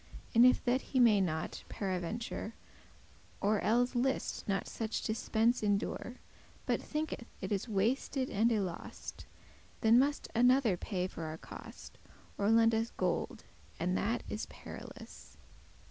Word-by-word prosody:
And 235 +2 +8
if 255 - +3
that 255 +2 +2
he 260 - -1
may 220 -5 +6
not, 160 -4 -2
paraventure, 200 +4 -3 0.9
Or 210 +1 +2
elles 245 +3 +2
list 260 +2 -1
not 195 0 0
such 225 -1 -3
dispence 225 +2 +1
endure, 205 +3 -1 0.5
But - - +1
thinketh 305 -6 -3
it 190 - -5
is 205 +3 -1
wasted 250 +6 0
and 225 +1 +2
y 230 - +2
lost, 185 -4 -5 0.5
Then 225 +2 +6
must 285 +2 +1
another 245 -3 +4
paye 180 0 -2
for 170 -3 -5
our 155 0 -5
cost, - - -11 0.4
Or 200 +1 +2
lend 225 0 +5
us 225 +1 +1
gold, - - -1 0.4
and 180 +2 0
that 230 +5 0
is 215 - -4
perilous. - - -11
225 Hz, 140 wpm, -33 LUFS, 195-245 Hz, 0.9 s, And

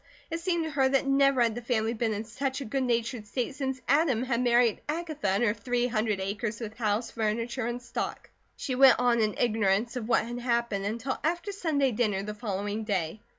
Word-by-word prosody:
It 330 - -2
seemed 340 -1 0
to 320 - -4
her 270 -2 +2
that 270 0 +2
never 275 -2 +4
had 230 -1 +1
the 240 - -5
family 230 -2 0
been 230 -1 -1
in 210 - -3
such 265 +4 -3
a 275 - -5
good 270 +4 -1
natured 235 -2 -1
state 250 +3 -2
since 265 -2 -3
Adam 275 -4 +3
had 250 -2 0
married 240 -2 +3
Agatha 310 -5 -3
and 195 +5 +2
her 210 -3 +3
three 245 +3 -1
hundred 215 -4 0
acres 210 +3 -3
with 220 -2 -6
house, 220 0 0
furniture, 230 +2 -1
and 240 +1 -3
stock. 240 -1 -5 0.3
She 265 - -3
went 265 +1 +7
on 240 -1 +3
in 215 -1 +1
ignorance 225 0 +1
of 235 -3 -4
what 225 - +3
had 240 +1 -5
happened 235 -5 0
until 230 +5 -2
after 345 +5 -1
Sunday 305 -9 +1
dinner 210 -4 0
the 210 +1 -4
following 205 0 -3
day. 195 -2 -2
235 Hz, 210 wpm, -28 LUFS, 215-265 Hz, 0.3 s, went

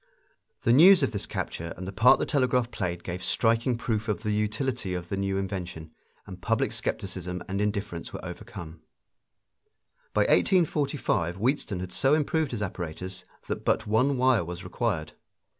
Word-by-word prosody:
The 115 - +4
news 175 +4 +8
of 135 - +1
this 100 -4 -4
capture 85 0 -4
and 90 - -6
the - - -4
part 110 +6 +6
the - - -1
telegraph 125 -3 +1
played 90 -4 -3
gave 90 +1 -5
striking 115 +1 +2
proof 110 -2 -2
of 105 0 -2
the 105 - 0
utility 105 -2 -1
of 85 -1 -5
the - - -1
new 95 0 -1
invention, 90 -5 -4 0.3
and - - -10
public - - +1
skepticism 90 -2 -3
and 100 +2 -2
indifference 105 -4 -2
were - - -7
overcome. 80 -1 -8 1.3
By - - +4
1845 140 - +2
Wheatstone 110 -4 0
had 90 0 -6
so 135 +8 +3
improved 155 0 +1
his 115 -5 -3
apparatus 90 0 -5 0.2
that - - -3
but - - +1
one 130 +6 +2
wire 125 -5 +4
was 90 +2 -7
required. 90 -4 -2
105 Hz, 160 wpm, -27 LUFS, 90-125 Hz, 1.3 s, news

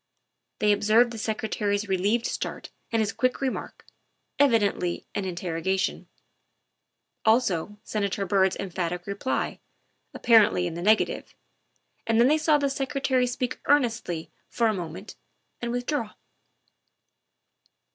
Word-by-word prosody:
They 210 -1 +3
observed 215 +4 +4
the 225 - -6
Secre 220 0 -2
tary's 205 0 -1
relieved 200 +5 +1
start - - -4 0.2
and 225 - +1
his 205 - -2
quick 255 -1 0
remark, 265 -2 -4 0.5
evidently 210 -9 +2
an 200 - -2
interrogation; 180 +1 -2 1.2
also 210 -4 +2
Senator 200 -1 -2
Byrd's 190 0 +2
emphatic 180 -1 -3
reply, 200 +6 -2 0.6
ap - - -9
parently 215 -6 +5
in 170 - -3
the 170 - -5
negative; 215 +4 +1 0.7
and 225 0 +3
then 240 +3 +6
they 310 +1 +3
saw 310 -1 +4
the 285 - -1
Secre 275 0 -2
tary 255 -2 +2
speak 250 0 -3
earnestly 235 - +1 0.2
for 235 - 0
a 220 - +3
moment 180 +1 -7 0.4
and 240 0 -2
withdraw. 245 -1 -2
215 Hz, 125 wpm, -26 LUFS, 190-245 Hz, 1.2 s, then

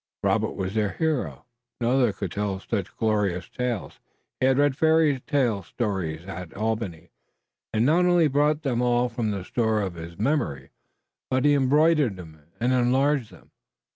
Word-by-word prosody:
Robert - - +1
was 95 0 -3
their 105 -3 0
hero. 160 -2 -2 0.3
No 120 0 +1
other 130 -4 +3
could 100 -3 -5
tell 100 -2 -2
such - - -4
glorious 105 -5 0
tales. 125 -5 -4 0.4
He 130 - +3
had 130 0 +3
read 145 -1 +3
fairy 160 -3 +3
stories 100 - -1
at 90 -3 -7
Albany, 110 -6 -3 0.6
and 110 - 0
he - - +3
not 170 +6 +4
only 175 -3 +4
brought 150 +2 +1
them 125 -4 0
all 125 0 +2
from 115 -2 -2
the 100 -3 -4
store 110 -1 0
of 95 -3 -2
his 85 0 -9
memory 115 - -1 0.6
but 130 +1 +1
he 145 - +5
embroidered 145 - +3
and 80 -3 -11 0.2
enlarged 130 +2 +2
them. - - -18
120 Hz, 160 wpm, -25 LUFS, 100-140 Hz, 0.6 s, he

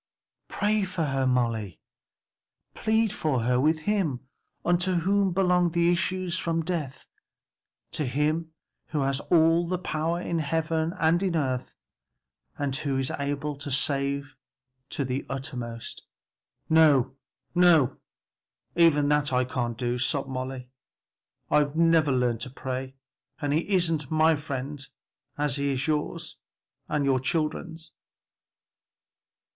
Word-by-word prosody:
"Pray 210 0 +1
for 185 -3 -2
her, 135 -2 0
Molly, 115 -7 0 0.9
plead 220 -1 +1
for 145 - 0
her 125 +2 +2
with 155 +3 +2
him 175 -9 0 0.4
unto 175 +2 +2
whom 195 +3 +2
belong 180 -1 +3
the 170 +1 +3
issues 185 0 -1
from 165 -1 -1
death; 155 -7 -3 0.9
to 150 - -1
him 155 +5 0 0.4
who 150 -2 -2
has 135 0 +1
all 170 +2 +3
power 165 -1 -2
in 170 -1 -2
heaven 160 +1 0
and 165 +2 +3
in 185 -3 0
earth 130 -5 -1 0.8
and 140 -2 -1
who 145 -3 -1
is 135 0 -1
able 145 +1 -2
to 145 0 -6
save 140 +1 0 0.5
to 140 - -2
the 130 +2 -2
uttermost." 125 -4 -5 0.7
"No, 145 -5 +4 0.4
no, 165 -7 +4 0.8
even 160 -4 +4
that 150 -1 +2
I 125 0 +2
can't 120 -2 -3
do," 120 0 -1
sobbed 135 +2 0
Molly, 130 -1 -5 0.8
"I've 145 0 +3
never 165 -3 +4
learned 125 -3 +1
to 130 - -4
pray, 130 0 -5 0.4
and 145 -1 -1
he 160 +6 0
isn't 165 -7 +1
my 160 0 +4
friend 140 -1 -5 0.5
as 145 -2 0
he 140 0 0
is 130 +1 -1
yours 155 +2 -2 0.5
and 150 -2 0
your 135 -1 +3
children's!" 160 +3 -3
150 Hz, 125 wpm, -27 LUFS, 135-165 Hz, 0.9 s, No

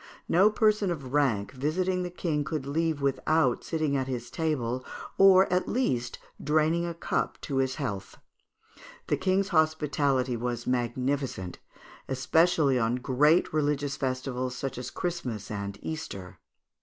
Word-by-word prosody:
No 190 +5 +5
person 215 -2 +2
of 140 -7 -5
rank 115 -9 +1
visiting 180 +7 -1
the 180 - -3
King 165 -4 -1
could 140 -1 -3
leave 155 0 -1
without 140 0 +1
sitting 155 -3 -1
at 130 -1 -1
his 120 -2 -5
table, 130 -6 -1 0.4
or 190 -1 +8
at 180 - +1
least 125 - -1 0.3
draining 155 +3 +2
a 170 - -4
cup 170 - -2
to 140 - -3
his 130 -1 +1
health. 100 -9 -5 0.9
The - - +2
King's 190 +1 +1
hospitality 145 -6 +1
was 120 0 -3
magnificent, 125 -5 -2 0.5
especially 145 +1 +2
on 115 +1 +1
great 140 +8 +3
religious 145 -2 0
festivals 130 -1 -2
such 130 -1 -4
as 125 - -5
Christmas 125 - -4
and 100 -1 -4
Easter. 100 - -6
140 Hz, 135 wpm, -28 LUFS, 125-165 Hz, 0.9 s, or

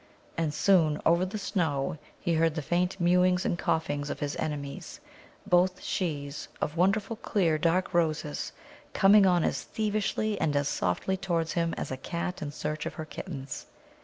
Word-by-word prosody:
And 165 -2 0
soon, 160 -3 +3
over 170 +3 +4
the 210 +4 -4
snow, 160 -8 -1 0.2
he 170 - 0
heard 165 -1 +2
the 155 - -2
faint 180 +5 0
mewings 180 +1 +3
and - - +1
coughings 145 -4 -1
of - - -4
his 145 0 -2
enemies, 140 -2 -5 0.5
both 180 +1 +3
shes, 145 -5 -3
of 150 - -2
wonderful 195 +5 +1
clear, 170 -8 +1
dark 175 +4 +1
Roses, 155 - 0 0.4
coming 195 0 +6
on 175 -2 +3
as - - 0
thievishly 215 0 -1
and 150 -2 +1
as 145 0 +2
softly 120 - 0
towards 170 -4 -1
him 170 -1 0
as - - -4
a 130 - -3
cat 170 +6 -4
in 145 - -3
search 155 +1 -3
of - - -6
her 160 - -5
kittens. 140 -4 -7
170 Hz, 165 wpm, -29 LUFS, 150-185 Hz, 0.5 s, coming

